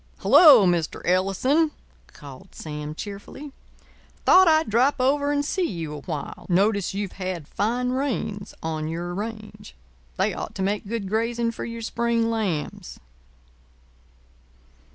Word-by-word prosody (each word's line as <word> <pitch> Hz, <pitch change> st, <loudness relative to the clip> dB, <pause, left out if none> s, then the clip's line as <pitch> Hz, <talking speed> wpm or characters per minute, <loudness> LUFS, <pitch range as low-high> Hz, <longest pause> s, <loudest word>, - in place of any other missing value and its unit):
"Hello, 275 Hz, -, +7 dB
Mr. 175 Hz, -3 st, 0 dB
Ellison," 195 Hz, -, +2 dB, 0.4 s
called 145 Hz, +5 st, -13 dB
Sam 150 Hz, 0 st, -6 dB
cheerfully. 205 Hz, -, -8 dB, 0.7 s
"Thought 375 Hz, 0 st, +7 dB
I'd 315 Hz, -1 st, +4 dB
drop 245 Hz, +6 st, +3 dB
over 285 Hz, +3 st, +2 dB
and 290 Hz, 0 st, 0 dB
see 360 Hz, +3 st, 0 dB
you 165 Hz, -4 st, -5 dB
a 150 Hz, -, -6 dB
while. 150 Hz, -2 st, -6 dB
Notice 195 Hz, +1 st, +1 dB
you've 200 Hz, -1 st, -3 dB
had 180 Hz, -5 st, -4 dB
fine 245 Hz, +4 st, -1 dB
rains 255 Hz, -6 st, -3 dB
on 155 Hz, -1 st, -3 dB
your 170 Hz, +2 st, -4 dB
range. 210 Hz, -, -7 dB, 0.4 s
They -, -, +1 dB
ought -, -, -6 dB
to 190 Hz, -, -2 dB
make 200 Hz, +1 st, -2 dB
good 220 Hz, -2 st, -3 dB
grazing 230 Hz, +3 st, -1 dB
for -, -, -6 dB
your 230 Hz, 0 st, -6 dB
spring 230 Hz, 0 st, 0 dB
lambs." 195 Hz, -9 st, -3 dB
210 Hz, 135 wpm, -24 LUFS, 175-250 Hz, 0.7 s, Hello